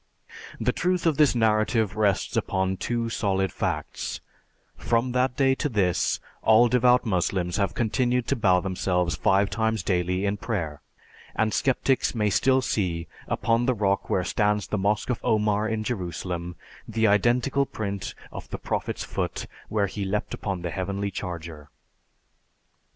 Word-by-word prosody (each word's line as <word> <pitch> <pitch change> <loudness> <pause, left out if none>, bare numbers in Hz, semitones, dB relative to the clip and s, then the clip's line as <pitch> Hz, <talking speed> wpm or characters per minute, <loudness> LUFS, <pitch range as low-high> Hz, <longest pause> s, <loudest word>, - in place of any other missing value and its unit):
The 115 +2 +1
truth 180 0 0
of 160 -3 +2
this 150 -4 +4
narrative 110 -2 +2
rests 105 -3 +1
upon 95 0 0
two 120 +2 -1
solid 95 -4 0
facts: - - -3 0.6
from 120 +2 0
that 125 +1 +1
day 135 -1 +4
to 145 +2 -2
this, 95 -7 +1 0.2
all 110 +2 +6
devout 125 +1 +4
Moslems 90 -2 0
have 100 -2 0
continued 120 +1 +1
to 140 - +2
bow 95 -6 +3
themselves 90 -3 0
five 95 +6 +2
times 110 -1 0
daily 90 +1 0
in 100 +1 0
prayer, 80 -11 -3 0.5
and 110 -1 +1
sceptics 135 -1 +1
may 105 -2 +1
still 130 +5 +3
see, 85 -8 -1 0.2
upon 115 +2 +1
the 130 - +2
rock 100 -2 0
where 90 - +1
stands 105 +1 +1
the 105 - -2
Mosque 105 +5 0
of 120 - -2
Omar 105 0 +1
in 110 0 -1
Jerusalem, 90 -5 -4 0.3
the 115 0 0
identical 120 +6 +2
print 100 -3 -4 0.2
of - - -9
the - - -4
Prophet's - - -3
foot - - -3 0.2
where 105 -2 +1
he 100 +1 -4
leaped 100 +2 -2
upon 95 -4 -4
the 85 - -3
Heavenly 100 +2 -3
Charger. 80 -5 -6
105 Hz, 150 wpm, -26 LUFS, 95-120 Hz, 0.6 s, all